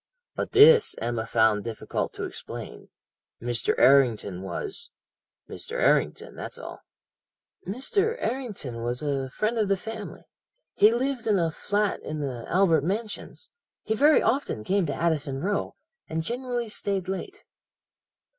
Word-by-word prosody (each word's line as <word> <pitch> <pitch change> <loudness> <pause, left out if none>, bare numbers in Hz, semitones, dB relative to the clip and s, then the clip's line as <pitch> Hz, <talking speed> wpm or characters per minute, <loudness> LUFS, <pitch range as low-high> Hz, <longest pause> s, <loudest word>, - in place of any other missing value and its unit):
"But - - -4
this 445 +2 +7
Emma 115 -1 -2
found 110 -2 +3
difficult 115 -2 -3
to - - -6
explain. - - -8 0.5
Mr. 120 -1 0
Errington 115 -9 +4
was 405 - -5 0.6
Mr. 455 - -7
Errington, - - +1
that's - - -7
all. - - -9 0.9
"'Mr. 390 - 0
Errington 210 - -4
was 120 +3 -2
a 135 -2 -1
friend 215 - -1
of 215 - +2
the 195 0 +2
family. 220 +2 -7 0.5
He 210 - +6
lived 255 0 -1
in 210 -2 +3
a 165 -2 +1
flat 205 +4 -1
in 155 0 -5
the 130 -5 -4
Albert 170 -5 +3
Mansions. 215 - -4 0.3
He 220 - -1
very 290 +7 +5
often 245 - 0
came 190 - +1
to 145 - -2
Addison 150 -5 0
Row, 200 +7 -2 0.3
and 160 0 -2
generally 245 +2 -3
stayed 200 -3 -1
late.' 375 - -5
195 Hz, 135 wpm, -26 LUFS, -, 0.9 s, this